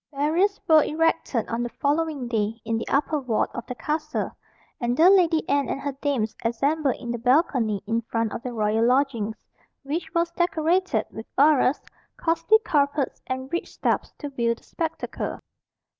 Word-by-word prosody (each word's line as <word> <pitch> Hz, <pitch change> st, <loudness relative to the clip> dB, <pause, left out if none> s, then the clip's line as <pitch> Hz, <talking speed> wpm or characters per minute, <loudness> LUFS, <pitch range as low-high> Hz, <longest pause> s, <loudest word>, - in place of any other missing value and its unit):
Barriers 325 Hz, +8 st, +1 dB
were 315 Hz, -2 st, +7 dB
erected 315 Hz, -7 st, 0 dB
on 230 Hz, +1 st, -2 dB
the 240 Hz, -, -2 dB
following 290 Hz, -1 st, -1 dB
day 225 Hz, -1 st, -1 dB
in 225 Hz, 0 st, 0 dB
the -, -, -5 dB
upper 295 Hz, +2 st, +1 dB
ward 250 Hz, -5 st, 0 dB
of 240 Hz, -, -6 dB
the 250 Hz, -, -5 dB
castle, 305 Hz, +6 st, -2 dB, 0.5 s
and 240 Hz, 0 st, -1 dB
the 345 Hz, +4 st, +7 dB
Lady 335 Hz, -5 st, +3 dB
Anne 280 Hz, -2 st, +1 dB
and -, -, -2 dB
her 285 Hz, 0 st, -3 dB
dames 245 Hz, -7 st, 0 dB
assembled 275 Hz, +5 st, +1 dB
in 240 Hz, -, -6 dB
the 240 Hz, -, -3 dB
balcony 245 Hz, -, +2 dB
in 230 Hz, +2 st, 0 dB
front 230 Hz, -1 st, -2 dB
of -, -, -5 dB
the 250 Hz, -, -5 dB
royal 220 Hz, -1 st, +1 dB
lodgings, 245 Hz, -5 st, 0 dB, 0.4 s
which 315 Hz, +4 st, -3 dB
was 335 Hz, 0 st, +1 dB
decorated 345 Hz, -, +1 dB
with 220 Hz, -, -8 dB
arras, 285 Hz, -1 st, +4 dB, 0.3 s
costly 330 Hz, +5 st, +3 dB
carpets, 285 Hz, -2 st, 0 dB
and 260 Hz, +2 st, -4 dB
rich 345 Hz, -, -2 dB
stuffs, -, -, 0 dB
to 290 Hz, -, -6 dB
view 235 Hz, -4 st, 0 dB
the -, -, -23 dB
spectacle. 325 Hz, -2 st, -4 dB
275 Hz, 170 wpm, -25 LUFS, 235-315 Hz, 0.5 s, were